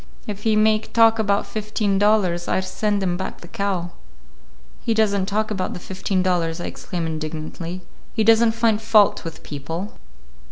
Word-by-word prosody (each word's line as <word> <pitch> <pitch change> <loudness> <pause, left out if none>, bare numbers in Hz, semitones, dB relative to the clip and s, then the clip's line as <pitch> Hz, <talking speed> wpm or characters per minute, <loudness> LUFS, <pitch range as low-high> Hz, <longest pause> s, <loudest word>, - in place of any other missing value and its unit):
If 205 -1 -6
he 220 0 +2
make 215 0 +2
talk 225 -1 +5
about 200 -1 +1
fifteen 210 -2 -1
dollars, 200 -5 +2
I - - +1
send 200 +2 -1
him 175 -2 0
back 190 - -6
the 175 - -11
cow." 185 -2 -2 0.9
"He 230 - -1
does 215 -2 +3
n't 190 -1 -1
talk 215 +1 -1
about 185 -3 -2
the - - -6
fifteen 190 +1 -2
dollars," 170 -2 0
I - - -4
exclaimed 175 -3 -4
indignantly. 160 +3 -5 0.3
"He 220 - +2
does 225 +1 +6
n't 225 -1 +2
find 225 -2 +2
fault 220 -2 +4
with 165 -1 -8
people." 165 +7 -5
200 Hz, 175 wpm, -22 LUFS, 175-215 Hz, 0.9 s, does